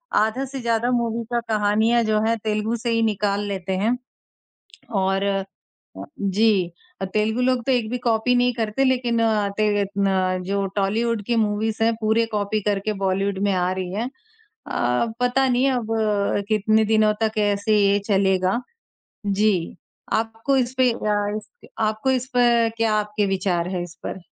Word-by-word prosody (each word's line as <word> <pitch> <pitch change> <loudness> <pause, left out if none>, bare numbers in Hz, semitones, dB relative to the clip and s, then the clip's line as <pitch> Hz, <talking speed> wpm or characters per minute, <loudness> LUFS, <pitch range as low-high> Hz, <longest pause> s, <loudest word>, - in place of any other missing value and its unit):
आधा 220 +5 +1
से 270 0 -7
ज़्यादा 235 0 0
मूवी 235 -1 0
का 240 - +2
कहानियाँ 220 +2 +2
जो 215 -1 +1
हैं 230 0 +1
तेलुगु 215 +1 -1
से 235 +1 -3
ही 230 0 +2
निकाल 205 -2 0
लेते 190 -1 -3
हैं 225 +6 +1 1.0
और 195 +1 +1 1.0
जी, 195 -3 +2 0.4
तेलुगु 220 +3 +1
लोग 255 -1 +1
तो 265 - +3
एक 235 -3 +1
भी 250 - -2
कॉपी 240 +1 +1
नहीं 245 0 +3
करते 225 +3 0
लेकिन 245 -3 +1
अ, 215 -3 +2
तेल 205 -1 +2
अ, 190 -2 0
जो 200 +1 -1
टॉलीवुड 215 +3 0
की 235 - +1
मूवीज़ 220 +1 0
हैं 230 0 +2
पूरे 220 +1 +2
कॉपी 205 +1 -1
करके 205 +1 0
बॉलीवुड 195 +1 0
में - - +2
आ 180 -1 +1
रही 185 -1 -4
हैं। 235 +5 -2 0.6
अ, 125 - +1
पता 260 +2 +2
नहीं 255 +2 +2
अब 240 -3 -2 0.6
कितने 215 +1 +3
दिनों 215 -1 +3
तक 220 0 0
ऐसे 205 +2 0
ही 205 -1 +4
ये 200 +1 +3
चलेगा, 190 +2 +2 0.7
जी, 205 +2 +3 0.6
आपको 225 +5 0
इस 250 0 0
पे 255 -1 +4
अ, 210 -2 -1
इस 215 - -10
पे, - - -17
आपको 220 +5 0
इस 260 - -9
पे 235 -2 +4
क्या 225 -1 +1
आपके 210 0 0
विचार 180 -2 -1
है, 175 - -2
इस 170 -2 -10
पर? 190 - -6
215 Hz, 165 wpm, -22 LUFS, 200-235 Hz, 1.0 s, ही